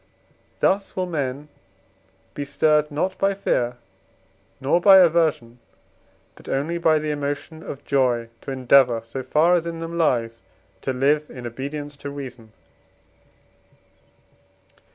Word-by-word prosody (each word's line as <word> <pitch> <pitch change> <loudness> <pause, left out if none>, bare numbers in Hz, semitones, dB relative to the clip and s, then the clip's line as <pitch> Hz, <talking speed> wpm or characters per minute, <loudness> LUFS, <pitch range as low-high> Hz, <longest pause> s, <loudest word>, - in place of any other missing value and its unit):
Thus 195 +1 +1
will 185 - -1
men 145 -4 -3 0.9
be 145 - -4
stirred 150 +1 +2
not 180 +6 -2
by 195 0 +2
fear, 125 -10 -1 0.8
nor 140 +6 +1
by 195 +1 +8
aversion, 160 -9 +2 0.7
but - - -14
only 155 +6 -1
by 160 -2 +3
the 155 0 -2
emotion 145 +2 -4
of 140 -3 -8
joy, 125 -4 +1
to - - -9
endeavour, 130 -2 +4
so 115 +4 -6
far 155 +6 +3
as 170 -1 +1
in 165 -1 -5
them 165 +1 -5
lies, 115 -7 0 0.4
to 135 - -2
live 145 +4 +1
in 125 -1 -9
obedience 145 +4 -6
to 140 - -7
reason. 125 -6 -9
145 Hz, 130 wpm, -23 LUFS, 130-165 Hz, 0.9 s, by